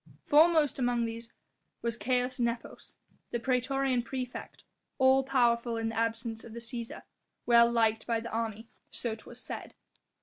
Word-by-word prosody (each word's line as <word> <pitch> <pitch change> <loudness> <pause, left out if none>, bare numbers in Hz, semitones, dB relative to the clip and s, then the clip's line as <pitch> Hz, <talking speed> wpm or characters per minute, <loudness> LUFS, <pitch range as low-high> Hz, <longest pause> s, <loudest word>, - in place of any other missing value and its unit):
Foremost 310 -2 +4
amongst 245 -2 +1
these 230 +1 -5 0.5
was 235 -1 0
Caius 250 +3 0
Nepos, 235 0 -3 0.3
the 240 - -2
praetorian 260 +1 +1
praefect, 250 0 -6 0.3
all 265 0 +5
powerful 240 -3 +2
in 225 0 -1
the 225 - -6
absence 230 0 -1
of 230 - -10
the 235 - -6
Cæsar, 235 0 -3 0.4
well 235 0 +6
liked 225 -2 +2
by 230 -1 +1
the 230 +1 -7
army, 225 0 -3 0.2
so 235 -2 -3
'twas 235 +2 -10
said. - - -6
235 Hz, 145 wpm, -30 LUFS, 230-255 Hz, 0.5 s, well